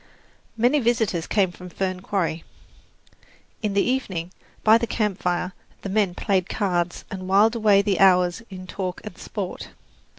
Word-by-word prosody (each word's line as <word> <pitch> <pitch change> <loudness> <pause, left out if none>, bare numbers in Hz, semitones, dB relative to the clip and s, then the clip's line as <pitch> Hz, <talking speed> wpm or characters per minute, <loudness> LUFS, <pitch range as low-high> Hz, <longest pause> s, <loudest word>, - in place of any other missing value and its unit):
Many 245 +6 +3
visitors 225 -8 0
came 195 -4 +2
to 180 +1 -11
Fern 185 0 -2
Quarry. 180 -4 -2 1.2
In 210 -2 -1
the 200 - +4
evening, 190 -10 -2 0.3
by 220 +1 +6
the 235 - -2
campfire, 185 -5 -1 0.3
the 195 - -4
men 195 -3 +1
played 190 -3 0
cards 180 -6 -1
and 185 -2 -6
whiled 205 +4 +4
away 210 -3 +4
the 200 -2 0
hours 180 0 +4
in 185 -1 -8
talk 185 -1 -4
and 215 -4 -8
sport. 190 -1 -6
195 Hz, 145 wpm, -24 LUFS, 180-215 Hz, 1.2 s, by